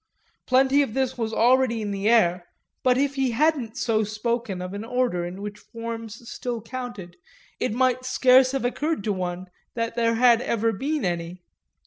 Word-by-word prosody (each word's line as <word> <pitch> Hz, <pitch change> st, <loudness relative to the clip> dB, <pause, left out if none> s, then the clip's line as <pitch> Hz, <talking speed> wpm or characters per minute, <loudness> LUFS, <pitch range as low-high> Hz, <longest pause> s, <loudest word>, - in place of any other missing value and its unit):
Plenty 265 Hz, +2 st, +4 dB
of 250 Hz, -6 st, -2 dB
this 265 Hz, -1 st, 0 dB
was 225 Hz, -2 st, -2 dB
already 240 Hz, 0 st, +3 dB
in 210 Hz, -2 st, -3 dB
the 200 Hz, +2 st, 0 dB
air, 180 Hz, -6 st, +3 dB, 0.3 s
but 250 Hz, -1 st, +3 dB
if 280 Hz, +1 st, +1 dB
he 270 Hz, -2 st, 0 dB
hadn't 275 Hz, -6 st, +1 dB
so 220 Hz, -4 st, +1 dB
spoken 215 Hz, -1 st, -2 dB
of 180 Hz, +1 st, -6 dB
an 205 Hz, +1 st, -5 dB
order 245 Hz, -6 st, 0 dB
in 180 Hz, +3 st, -6 dB
which 210 Hz, 0 st, -6 dB
forms 230 Hz, 0 st, -8 dB
still 240 Hz, -1 st, -4 dB
counted 225 Hz, -6 st, -7 dB, 0.4 s
it -, -, 0 dB
might 255 Hz, +2 st, +1 dB
scarce 255 Hz, 0 st, +4 dB
have 270 Hz, -2 st, -1 dB
occurred 295 Hz, 0 st, -1 dB
to 210 Hz, -, 0 dB
one 180 Hz, -1 st, -4 dB, 0.3 s
that 230 Hz, -1 st, -2 dB
there 230 Hz, -1 st, +2 dB
had 240 Hz, 0 st, +5 dB
ever 230 Hz, -2 st, 0 dB
been 280 Hz, +7 st, -2 dB
any. 175 Hz, 0 st, -3 dB
230 Hz, 175 wpm, -24 LUFS, 205-255 Hz, 0.4 s, had